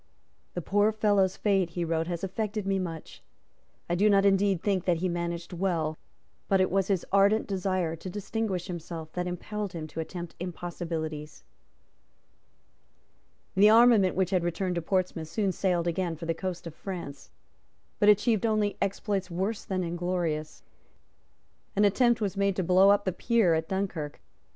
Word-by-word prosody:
"The 175 - -3
poor 205 +4 +3
fellow's 205 -3 +2
fate," 195 -4 +1
he 175 - 0
wrote, 165 0 -1
"has 175 0 -4
affected 210 +2 -3
me 195 -1 +1
much. 165 -4 -6 0.7
I 175 - -1
do 200 +5 +3
not 200 -1 +4
indeed 195 -2 +3
think 190 -3 0
that 175 -2 +2
he 185 +3 -1
managed 170 0 -3
well; 170 -4 -1 0.5
but 195 - +3
it 185 - +2
was 195 0 +1
his 195 -4 0
ardent 200 +3 +4
desire 185 -4 -1
to 165 +3 -8
distinguish 200 -1 -3
himself 165 -2 -7
that 180 0 -2
impelled 200 +3 -4
him 165 -2 -5
to 160 - -7
attempt 170 +1 -6
impossibilities." 165 -3 -5 2.1
The 205 +2 +6
armament 225 -4 +6
which 185 -2 +1
had 185 -3 +2
returned 180 +2 -1
to 170 - -2
Portsmouth 180 -2 -1
soon 195 +4 0
sailed 180 -2 0
again 170 0 -1
for 165 +1 -8
the 165 - 0
coast 180 +1 -5
of 165 - -7
France, 170 -6 -7 0.7
but 205 - +5
achieved 210 +1 +3
only 215 -2 0
exploits 200 -1 -1
worse 190 +5 -2
than 185 -1 -2
inglorious. 170 -3 -2 1.1
An 205 +1 +4
attempt 240 +3 +3
was 205 -3 -2
made 200 -1 +1
to 190 - 0
blow 185 +3 +5
up 205 0 +4
the 185 - +1
pier 225 -3 +2
at 160 0 -1
Dunkirk. 185 -6 -3
185 Hz, 165 wpm, -28 LUFS, 170-200 Hz, 2.1 s, The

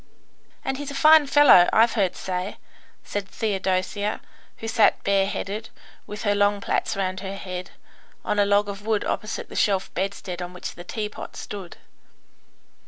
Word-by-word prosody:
"And 270 0 -2
he's 290 -1 -5
a 280 - -6
fine 310 0 +6
fellow, 280 -11 +7
I've 225 +1 +4
heard 195 -5 +1
say," 185 +1 -4 0.5
said 205 -1 -4
Theodosia, 200 0 -1 0.4
who 225 - -6
sat 225 -1 +3
bareheaded, 200 +2 -1 0.4
with 210 0 -7
her 205 -2 +2
long 205 0 +2
plaits - - -1
round 190 -1 -2
her 195 0 -5
head, 185 -2 -6 0.6
on 210 - 0
a 205 - +5
log 205 0 +3
of 200 0 -6
wood 220 -1 0
opposite 215 - -3
the - - -11
shelf 195 -3 +1
bedstead 185 -1 -4
on 180 0 -6
which 180 - -6
the 175 - -10
teapot 210 +3 -6
stood. 195 -4 -8
205 Hz, 160 wpm, -24 LUFS, 190-215 Hz, 0.6 s, fellow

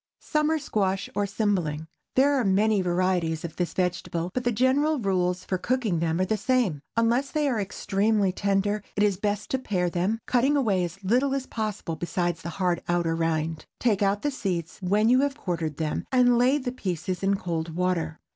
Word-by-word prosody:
SUMMER 305 +1 +1
SQUASH 195 -9 -1
OR 205 0 0
CYMBLING. 185 -7 -1 0.3
There 280 +2 +4
are 270 -3 +2
many 205 +1 +3
varieties 175 -2 0
of 165 - -7
this 175 -1 -1
vegetable, 175 -1 -1
but 250 - -2
the 240 - +1
general 265 +7 +2
rules 185 -5 0
for 185 - -2
cooking 230 -7 0
them 165 +1 0
are 185 - +2
the 215 +3 0
same. 215 - +1 0.2
Unless 235 +4 +2
they 300 0 0
are 235 -6 0
extremely 200 0 +1
tender, 200 +2 0
it 205 - +2
is 200 -3 +2
best 205 +1 -2
to 265 - +1
pare 180 -8 -1
them, 185 +6 0
cutting 265 +4 +2
away 205 -9 +2
as 175 +3 -6
little 255 +7 +2
as 270 -1 -2
possible 215 -8 -3
besides 175 -1 -2
the 170 - -5
hard 180 -3 +1
outer 170 -2 +1
rind. 160 -1 -1
Take 215 -5 +1
out 200 +1 +1
the 290 - +1
seeds, 180 - -3
when 205 +4 +2
you 250 +2 +5
have 280 0 0
quartered 165 - -3
them, 155 -2 -2
and 250 -2 +5
lay 250 +4 +4
the 255 -3 -3
pieces 185 -6 -3
in 195 0 +2
cold 165 -3 -3
water. 180 -3 -1
195 Hz, 195 wpm, -26 LUFS, 175-240 Hz, 0.3 s, you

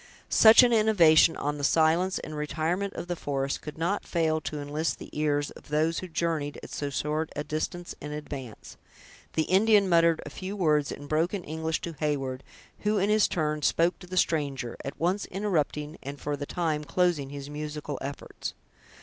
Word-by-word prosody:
Such 225 +3 +8
an 240 -1 +4
innovation 175 -8 +5
on 145 +1 -2
the - - -5
silence 165 +5 +3
and 155 - -6
retirement 160 +6 -1
of - - -5
the 175 0 -3
forest 140 -3 -2
could 150 - -8
not 175 +5 -1
fail 160 -2 0
to 150 0 -4
enlist 150 +3 -2
the - - -11
ears 145 -1 0
of - - -14
those 155 +2 +1
who 185 - -6
journeyed 160 -4 -2
at - - -9
so 145 - -3
short 150 +3 -1
a 150 - -2
distance 155 +4 -4
in 150 - -6
advance. 140 -6 -7 0.6
The 160 - +2
Indian 200 +3 +4
muttered 170 -2 +4
a 145 - -7
few 190 +6 -6
words 150 -6 +2
in 145 - -7
broken 165 +6 0
English 160 +1 -2
to 170 - -5
Heyward, 135 -4 -2 0.4
who, 210 0 +1
in 200 +2 +2
his 215 -1 +4
turn, 150 -2 -1
spoke 165 +5 +2
to 180 - -12
the 185 +1 -5
stranger; 140 -8 0
at 135 - -6
once 185 +5 0
interrupting, 160 -6 -2
and, 140 +1 -7
for 145 0 -2
the 145 0 -6
time, 160 -4 -1
closing 155 -2 +1
his 140 0 -7
musical 150 -1 -5
efforts. 140 0 -6
155 Hz, 185 wpm, -28 LUFS, 145-175 Hz, 0.6 s, Such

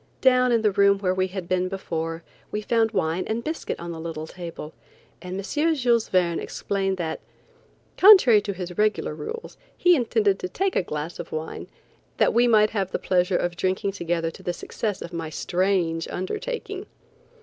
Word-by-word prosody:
Down 255 -1 +4
in 230 -2 +2
the 210 - +4
room 200 0 +4
where 185 -2 0
we 185 0 0
had 185 -2 -6
been 185 0 +1
before, 165 -3 -4 0.3
we 210 - -2
found 225 0 +2
wine 185 -4 0
and 225 +2 -2
biscuit 315 +1 -4
on 170 0 -6
the 165 - -7
little 160 -1 -5
table, 165 -2 -8 0.5
and 180 +1 -5
M. 300 +12 0
Jules 240 -5 +2
Verne 175 -3 +2
explained 195 -1 -2
that, 165 -3 -3 0.8
contrary 370 - +8
to 205 -1 -4
his 180 -1 -6
regular 215 0 +1
rules, 460 +1 -7 0.2
he 355 0 +5
intended 220 -7 +1
to 180 - -4
take 385 - -1
a - - +3
glass 155 -1 -5
of - - -7
wine, 155 0 -5 0.5
that - - +3
we 240 +1 +4
might 215 -2 +4
have 195 -4 -1
the - - -1
pleasure 180 0 +1
of 175 0 -2
drinking 185 +2 -1
together 170 -3 -2
to - - -14
the 175 - -2
success 205 +3 -4
of 170 - -9
my 165 -2 -4
strange 175 -1 0
undertaking. 470 - -4
190 Hz, 185 wpm, -24 LUFS, 175-220 Hz, 0.8 s, contrary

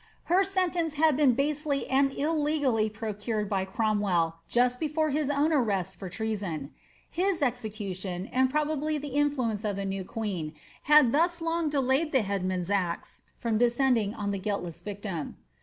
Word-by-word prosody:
Her 365 +3 +3
sentence 360 -4 0
had 305 -1 +3
been 275 -3 +4
basely 285 +2 0
and 275 +1 +3
illegally 290 -7 +1
procured 215 0 -3
by 195 -2 0
Cromwell, 190 -5 0
just 250 +1 +2
before 310 0 0
his 295 0 0
own 290 +3 +2
arrest 205 - 0
for 190 - -7
treason.' 195 -9 -3 0.4
His 360 -2 0
execution, 205 -7 -3
and 260 0 +3
probably 305 +1 0
the 285 -2 -6
in 290 0 +4
fluence 230 -7 -2
of 205 -2 -1
the 200 0 -3
new 195 0 -3
queen, 185 -7 -4 0.4
had 300 -5 +7
thus 340 +4 +2
long 330 -1 0
delayed 280 +2 +1
the 260 -4 +4
headsman's 185 -2 -2
axe 180 -4 -2 0.2
from 225 -3 0
descending 240 -3 +2
on 205 -1 -2
the 200 - -2
guiltless 185 -4 -3
victim. 200 -4 -5
240 Hz, 155 wpm, -28 LUFS, 200-295 Hz, 0.4 s, had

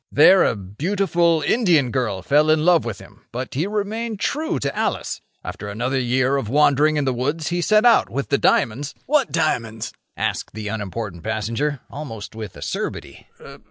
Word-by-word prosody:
There 185 +6 +7
a - - +1
beautiful 170 - 0
Indian 170 - +3
girl 110 -8 -1
fell 150 +5 +3
in 155 0 +3
love 175 -5 +4
with 115 -5 -4
him, - - -16
but 125 +2 -5
he 155 +8 -1
remained 215 +1 -3
true 310 +7 -1
to 140 0 -3
Alice. - - -2 0.2
After 105 - -6
another 125 +6 -1
year 130 +2 +1
of 115 -6 -3
wandering 150 +2 +3
in 145 - 0
the 130 - +1
woods, 145 +6 -2
he 175 0 -1
set 215 +5 +3
out 240 - +5
with 140 +3 -3
the 140 - +2
diamonds—" 130 +6 +1
"What 290 -1 +2
diamonds?" 115 -9 -1 0.2
asked - - -3
the 105 -1 -4
unimportant 100 -3 -5
passenger, 115 +6 -2
almost 130 -8 -7
with 110 -3 -8
acerbity. - - -5
140 Hz, 170 wpm, -21 LUFS, 115-170 Hz, 0.2 s, There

